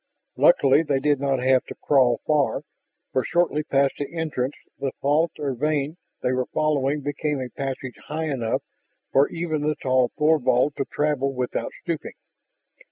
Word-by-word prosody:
Luckily, - - +5
they 145 -4 0
did 145 0 +2
not 135 -2 0
have 130 0 +4
to - - -8
crawl 130 -4 +3
far, 150 -3 +1 0.5
for 130 - +1
shortly 170 +1 +1
past 140 -2 +2
the 145 - -4
entrance 155 -5 -2 0.2
the 135 - -2
fault 150 +4 +2
or 145 -3 -2
vein 150 +4 -1 0.3
they 125 - +2
were 130 -1 0
following 145 -1 0
became 145 +1 -2
a 130 -1 -4
passage 135 0 -5
high 160 +2 -2
enough 120 -5 -1 0.5
for 140 +1 +4
even 165 -3 -2
the 150 +1 0
tall 130 -2 +2
Thorvald 150 -3 +3
to 135 - -1
travel 140 -2 -1
without 125 -1 -2
stooping. 170 -3 -4
140 Hz, 160 wpm, -24 LUFS, 130-150 Hz, 0.5 s, Luckily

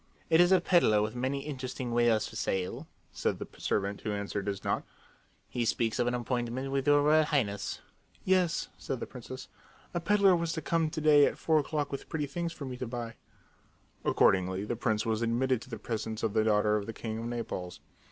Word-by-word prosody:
"It 160 +1 +7
is 175 +1 +5
a 190 - +7
peddler 170 - +4
with 110 +1 -2
many 130 +3 -1
interesting 130 -3 -4
wares 115 -2 +3
for - - -11
sale," 95 -1 -2 0.2
said - - -1
the - - -6
servant 100 0 -1
who 110 - -2
answered 100 0 -3
his 100 -1 -3
knock. - - 0 0.6
"He 120 - -2
speaks 115 -1 0
of 120 - +2
an 120 - +1
appointment 125 +2 -2
with 135 0 -1
your 145 0 +5
Royal 155 +1 +5
Highness." 105 -10 -1 0.4
"Yes," 185 -3 +2
said 130 - -4
the - - -4
princess. 130 +1 -9 0.5
"A 175 - 0
peddler 195 +1 +4
was 170 -1 -1
to 160 - -3
come 165 -1 +1
to 155 - -4
day 150 -2 +6
at - - -3
four 160 -1 +3
o'clock 150 0 -2
with 140 - -6
pretty 155 -3 -1
things 170 +4 -3
for 150 -3 -7
me 130 -1 -5
to 125 -1 -4
buy." 120 -1 -5 0.9
Accordingly, 95 +1 +3
the 120 - -2
prince 110 -2 0
was 110 0 0
admitted 120 +1 +1
to - - -12
the 115 - -5
presence 110 0 -4
of 110 -3 0
the 110 -1 +3
daughter 105 0 +3
of 100 - -4
the 115 - -4
king 110 0 -5
of 115 - -5
Naples. 115 -7 -4
120 Hz, 210 wpm, -30 LUFS, 110-150 Hz, 0.9 s, It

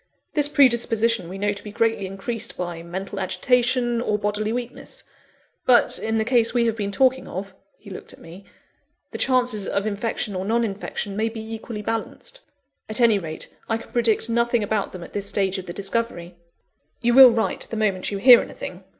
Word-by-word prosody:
This 295 -1 +2
predisposition 230 - +2
we 190 - -7
know 205 +1 0
to 200 - -9
be 210 - -8
greatly 225 -2 0
increased 225 +4 -6
by 175 -2 -4
mental 190 +4 -6
agitation, 240 +4 +1
or 210 -3 0
bodily 210 +1 -1
weakness; 245 +1 -6 0.6
but, 245 -2 +4
in 220 0 -1
the 220 - 0
case 235 -1 +2
we 235 -1 +3
have 225 -1 0
been 205 -2 -3
talking 260 +3 +2
of," 195 +1 -6 0.2
(he 205 - -13
looked 185 - -9
at - - -15
me,) 170 +4 -13 0.7
"the - - -6
chances 245 -6 +1
of 200 +1 -1
infection 215 +1 -2
or 185 - -2
non 230 +4 +1
infection 200 -1 -4
may 220 +2 0
be 225 0 -7
equally 220 -1 -6
balanced. 225 - -5 0.5
At 215 - 0
any 230 -4 +4
rate, 160 -3 -7
I 225 - +1
can 230 - -13
predict 230 -2 +2
nothing 235 -1 +1
about 205 -1 -1
them 180 -2 -8
at - - -12
this 200 -1 -2
stage 195 -1 0
of 185 - -10
the - - -5
discovery." 195 -3 -3 0.7
"You 240 0 +2
will 260 0 +10
write 230 -1 -1
the 225 - -4
moment 200 -4 0
you 200 - -3
hear 245 +3 +8
anything?" 180 +1 -8
220 Hz, 195 wpm, -23 LUFS, 195-235 Hz, 0.7 s, will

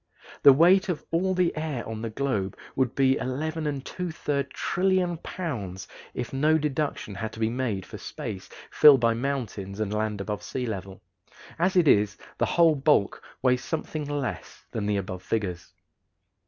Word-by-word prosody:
The 140 - +10
weight 180 +8 +5
of 175 - -3
all 185 +3 +1
the 180 -1 +2
air 155 -6 -3
on 110 -1 -5
the 115 - -3
globe 110 -6 -2 0.2
would 130 -2 0
be 135 -1 +3
11 150 +2 -2
2/3 145 -6 -3
trillion 180 -1 0
pounds 110 - -5 0.3
if 125 +1 -4
no 155 +4 +3
deduction 150 -7 -2
had 110 +3 -4
to - - -9
be 110 0 +1
made 115 -7 -2
for - - -9
space - - -6 0.2
filled 145 -3 +8
by 115 -1 +3
mountains 115 -6 -3
and 105 -1 -1
land 105 -1 -1
above 105 +1 -3
sea 130 -1 -4
level. 95 -3 -6 0.6
As 185 +3 +2
it 175 -4 +5
is, 105 -4 +4 0.2
the - - +2
whole 170 -2 +5
bulk 140 -7 +2 0.2
weighs 125 -1 +3
something 155 -1 -3
less 140 - -4
than 105 -2 -2
the 105 -1 +1
above 95 -2 -4
figures. 90 -7 -3
130 Hz, 165 wpm, -26 LUFS, 105-155 Hz, 0.6 s, The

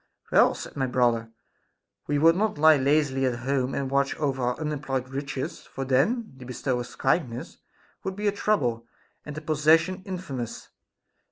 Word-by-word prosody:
Well, - - +5
said - - -8
my 135 -2 0
brother, 120 -2 +1 0.8
we 145 - +1
would 165 +3 +5
not 210 -2 0
lie 155 +1 +7
lazily 140 -1 +2
at 120 -1 -2
home, 135 -1 0
and 135 -1 -2
watch 140 0 +1
over 135 -3 -1
our 125 0 -1
unemployed 140 -4 -2
riches; 135 0 -4
for 135 - -6
then 160 - +1
the 130 - -10
bestower's 125 -1 -3
kindness 130 -4 -1 0.5
would 190 0 -3
be 210 +1 -4
a 205 - +4
trouble, 125 - 0 0.4
and 150 - -6
the 155 - -5
possession 160 +4 +3
infamous. 160 - -6
140 Hz, 160 wpm, -26 LUFS, 130-160 Hz, 0.8 s, lie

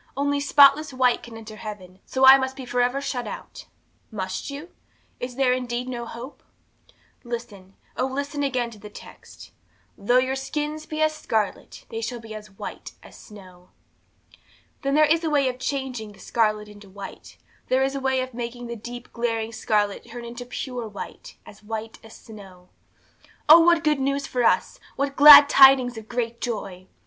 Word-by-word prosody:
Only 285 0 0
spotless 285 +1 +5
white 255 -2 +2
can 230 -2 -11
enter 220 -1 -11
heaven, 190 -4 -9
so 265 0 +2
I 265 +1 +9
must 265 0 -3
be 265 - -8
for 245 0 -1
ever 250 +3 0
shut 265 -3 -4
out! - - -9 0.4
'Must 190 -1 -5
you? 290 +5 -8 0.5
Is 245 0 -6
there 260 -1 +2
indeed 250 -1 -3
no 240 -2 -5
hope? 240 +5 -10 0.8
'Listen, 230 -6 -8 0.2
oh, 255 - -1
listen 285 +2 -4
again 255 -4 -1
to 215 - -14
the 210 - -11
text - - -14 0.4
"though 245 +5 +1
your 260 +1 +1
sins 300 +3 -4
be 310 0 -1
as 310 0 +2
scarlet, 220 -8 -3
they 225 - -5
shall 235 +1 -4
be 225 -1 -10
as 210 -1 -9
white 195 - -9
as - - -15
snow." 185 -4 -15 1.1
'Then 275 0 -1
there 305 0 +6
is 325 +3 +1
a 320 - 0
way 285 -3 +2
of 250 0 -4
changing 255 -6 -4
the 195 - -19
scarlet 215 -2 0
into 205 -1 -14
white; 195 0 -11 0.3
there 260 +1 +2
is 270 0 -1
a - - -2
way 265 -1 0
of 255 0 -6
making 240 +1 -6
the 235 0 -6
deep, 240 +2 -10
glaring 230 -1 -2
scarlet 210 -2 -1
turn 240 +1 -8
into 240 +1 -8
pure 250 -2 -5
white, 205 -2 -10
as 210 - -15
white 220 +1 -7
as 225 - -14
snow. 190 -5 -14 0.8
'Oh, 315 +3 +10
what 340 0 +4
good 300 -2 +1
news 275 +1 -1
for 250 -1 -2
us! - - +1 0.2
What 280 0 -2
glad 290 0 +10
tidings 265 -3 +6
of 220 -1 -10
great 235 -1 -3
joy! 190 -6 -5
245 Hz, 180 wpm, -24 LUFS, 220-275 Hz, 1.1 s, Oh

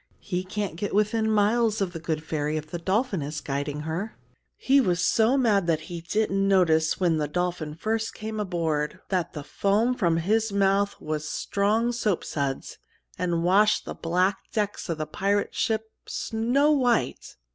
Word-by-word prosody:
He 185 -2 -2
can't 195 -3 -4
get 200 +2 -3
within 220 +1 +2
miles 220 +1 +2
of 190 -3 -1
The 165 - -5
Good 160 -1 -3
Ferry 155 -1 -2
if 155 0 -7
the 175 - -3
dolphin 195 - 0
is 150 +2 -4
guiding 145 +1 -3
her. 165 +8 -4 0.4
He 275 +1 +4
was 180 -7 +1
so 225 +8 +3
mad 210 -8 +2
that 160 -2 +1
he 170 -1 -5
didn't 195 +2 0
notice 165 -4 +3
when 170 -4 +2
the 150 -1 0
dolphin 170 -1 -2
first 220 +6 -2
came 215 0 -5
aboard 160 -6 -1
that 185 -3 -1
the 150 - -6
foam 205 - +1
from 170 -9 +1
his 215 +6 +1
mouth 200 0 +2
was 150 -1 -3
strong 215 +8 +1
soapsuds, 165 - -2 0.4
and 170 -2 0
washed 205 +4 +4
the - - -5
black 180 +4 0
decks 205 -3 -2
of 165 - -1
the 155 - -2
pirate 200 +6 0
ship 220 0 -1 0.2
snow 245 +7 +1
white." 250 -5 +1
190 Hz, 170 wpm, -26 LUFS, 165-215 Hz, 0.4 s, He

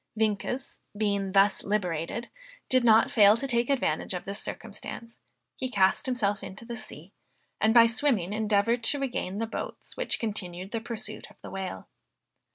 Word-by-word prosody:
Vienkes 220 +5 -1 0.2
being 200 -2 0
thus 195 0 +4
liberated, 195 +2 -2 0.4
did 255 -1 +4
not 225 -1 +5
fail 210 0 +7
to 275 - -3
take 240 -2 +1
advantage 270 -7 0
of 180 - -5
this 200 +1 -4
circumstance; 230 +1 -7 0.4
he 255 - -3
cast 195 0 +2
himself 210 -6 0
into 195 +5 -9
the 235 0 -5
sea, - - -10 0.5
and 220 - +4
by 230 0 +8
swimming, 225 -5 +1
endeavored 220 +2 +1
to 285 - +2
regain 250 -8 -3
the 225 - -1
boats 225 - -6
which - - 0
continued 190 -4 -4
the 230 - -2
pursuit 220 -2 -6
of - - -18
the - - -8
whale. 190 - -5
220 Hz, 165 wpm, -28 LUFS, 200-235 Hz, 0.5 s, by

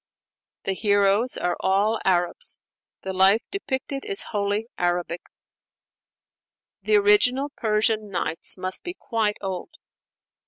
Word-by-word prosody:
The 195 - 0
heroes 205 +3 +2
are 175 - -1
all 205 +4 +1
Arabs; 180 - +1 0.5
the 190 - -4
life 195 +4 +4
depicted 275 -7 -4
is 405 -2 +1
wholly 205 +2 -1
Arabic. 175 -1 -1 1.6
The 430 - +2
original 290 -10 +4
Persian 215 -3 0
'Nights' 175 -2 -1
must 185 0 -1
be 355 0 -6
quite 220 - -1
old. 190 - -4
210 Hz, 110 wpm, -24 LUFS, 190-255 Hz, 1.6 s, life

